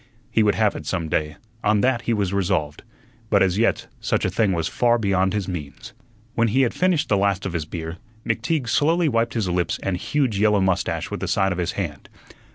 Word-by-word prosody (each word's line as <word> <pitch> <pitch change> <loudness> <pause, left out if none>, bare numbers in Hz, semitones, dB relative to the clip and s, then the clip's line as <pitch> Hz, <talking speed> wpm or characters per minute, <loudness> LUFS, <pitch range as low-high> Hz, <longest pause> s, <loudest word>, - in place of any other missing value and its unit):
He 110 - +3
would 105 -1 +3
have 110 -2 +2
it - - -7
some 85 -4 -2
day, 75 -1 -1 0.3
on 105 0 +3
that 125 -2 +2
he 120 - -1
was 100 -2 -1
resolved; 90 -7 -1 0.5
but - - +4
as 95 +1 +1
yet 115 - +1
such - - 0
a - - 0
thing 110 -4 +2
was 85 -3 0
far 120 -1 +2
beyond 95 -2 +1
his 100 -3 -2
means. 90 +6 -7 0.4
When 115 -1 +2
he 125 +5 +2
had 120 - 0
finished 180 -4 +1
the 105 - +2
last 100 -1 +1
of 95 - -3
his 80 -3 -2
beer, 80 +1 -6 0.3
McTeague 120 +5 -1
slowly 160 +7 +2
wiped 115 -3 0
his 110 -5 0
lips 90 0 -1
and 95 - 0
huge 125 +2 0
yellow 105 -1 +4
mustache 95 -2 0
with - - -3
the - - -3
side 95 -1 +1
of 90 - -3
his 85 -1 -1
hand. 80 -8 -5
100 Hz, 220 wpm, -23 LUFS, 90-115 Hz, 0.5 s, but